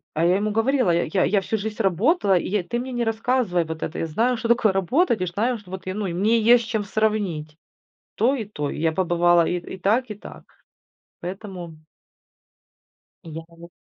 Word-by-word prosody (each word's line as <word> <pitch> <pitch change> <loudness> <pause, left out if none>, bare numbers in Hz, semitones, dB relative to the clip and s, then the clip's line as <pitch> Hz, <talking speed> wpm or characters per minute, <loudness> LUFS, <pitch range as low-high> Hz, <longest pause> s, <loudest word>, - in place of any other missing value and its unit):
А 160 +2 +2
я 180 +2 +4
ему 210 +1 -1
говорила: 225 0 +2
"Я 170 0 +2
я 185 +4 0
я 200 -1 +2
всю 220 +3 -2
жизнь 215 +2 -4
работала, 200 - +2
и - - -2
я 200 -1 0
ты 240 +7 -3
мне 255 +2 -5
не 240 -1 -1
рассказывай 225 -5 0
вот 160 0 -6
это, - - -4
я - - -1
знаю, 235 +10 +1
что 225 - -3
такое 230 -3 +3
работать, 225 - +1
и - - +1
знаю, 220 +8 -1
что 190 -3 -16
вот 190 0 -7
я, 185 - -3
ну, 210 +1 -3
и 175 - -4
мне 215 +6 +2
есть 235 +1 +5
с - - -10
чем 220 -2 -1
сравнить". 195 -8 -1 0.6
То 245 +6 +3
и 240 -5 -3
то. 150 -8 -4
Я 160 +1 0
побывала 175 -1 +3
и 180 - 0
и 185 +2 -9
так, 225 +6 +1
и - - -3
так. 205 - -12 0.8
Поэтому 180 -3 -7 1.5
И 165 - -9
я 160 +1 -7
ему 170 0 -14
200 Hz, 215 wpm, -23 LUFS, 175-225 Hz, 1.5 s, есть